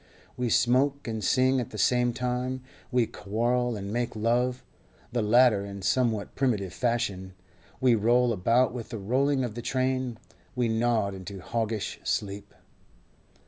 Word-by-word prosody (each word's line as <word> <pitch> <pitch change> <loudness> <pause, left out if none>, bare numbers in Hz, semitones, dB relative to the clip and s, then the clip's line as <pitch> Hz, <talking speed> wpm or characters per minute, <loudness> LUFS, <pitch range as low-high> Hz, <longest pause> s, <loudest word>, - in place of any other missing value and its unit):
We 125 -1 -1
smoke 130 +5 +2
and 110 -2 -3
sing 130 +5 +3
at 120 - -3
the 105 - -8
same 120 +4 +3
time; 125 +1 -2 0.3
we 125 -2 +3
quarrel 120 +4 -1
and 100 0 -5
make 120 0 -2
love—the 120 +1 -2
latter 110 -1 +4
in 100 -1 -8
somewhat 115 -1 0
primitive 105 -9 0
fashion; 105 -7 -2 0.4
we 130 -2 +4
roll 120 +2 +3
about 115 +5 +2
with 120 -3 -6
the 115 - -5
rolling 130 +6 +1
of 120 -4 -3
the 120 - -6
train; 130 -1 -1 0.4
we 120 -2 +1
nod 110 -3 +1
into 95 +1 -8
hoggish 110 +2 -3
sleep. 100 0 -3
120 Hz, 140 wpm, -27 LUFS, 105-125 Hz, 0.4 s, latter